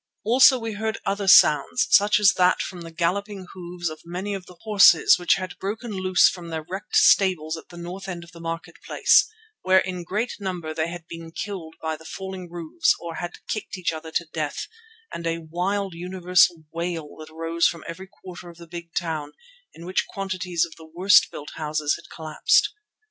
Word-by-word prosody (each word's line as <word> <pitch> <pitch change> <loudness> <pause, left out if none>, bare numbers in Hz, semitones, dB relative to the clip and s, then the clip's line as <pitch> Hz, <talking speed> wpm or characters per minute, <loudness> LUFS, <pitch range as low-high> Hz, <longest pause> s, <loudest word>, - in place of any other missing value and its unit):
Also 255 +4 +6
we 225 -2 -4
heard 220 +2 -3
other 200 0 -1
sounds, 155 - +6
such 205 +1 +5
as 205 -2 +6
that 180 0 +3
from 180 -2 -5
the 165 - -8
galloping 190 +4 -2
hoofs 175 -1 -6
of 155 -1 -6
many 180 +4 -4
of 190 -2 -6
the 180 - -14
horses 200 -7 +6
which 175 - +3
had 185 -1 -6
broken 220 +4 -4
loose 185 -2 +4
from 175 -2 -4
their 160 -1 -4
wrecked 190 +3 -6
stables 170 -5 +4
at 160 - -12
the 175 - -12
north 180 +3 -7
end 175 -2 -5
of 170 - -15
the 170 - -13
market 165 0 -6
place, 400 - +4 0.3
where 185 0 +4
in 185 -1 -1
great 210 +8 -2
number 180 -5 -4
they 160 0 -1
had 175 -1 -9
been 165 -1 -9
killed 165 -3 -6
by 160 0 -1
the 160 - -14
falling 190 +1 -7
roofs 170 -1 0
or 170 -1 -7
had 175 0 -7
kicked 210 -3 -4
each 175 -2 -1
other 160 0 -7
to 170 - -1
death, 155 -2 -3 0.5
and 170 0 -4
a 165 0 -1
wild 195 +2 -1
universal 180 -1 +2
wail 165 -2 -3
that 155 0 -10
rose 165 +1 +1
from 170 - -5
every 185 +3 -8
quarter 180 -3 -11
of 170 - -14
the 170 - -12
big 170 0 -9
town, 155 -4 -3 0.4
in 170 - -12
which 185 - -1
quantities 185 -3 -2
of 165 - -13
the 160 -1 -14
worst 190 +4 +5
built 145 - -9
houses 150 -1 -1
had - - -13
collapsed. 155 - +1
175 Hz, 195 wpm, -24 LUFS, 165-190 Hz, 0.5 s, Also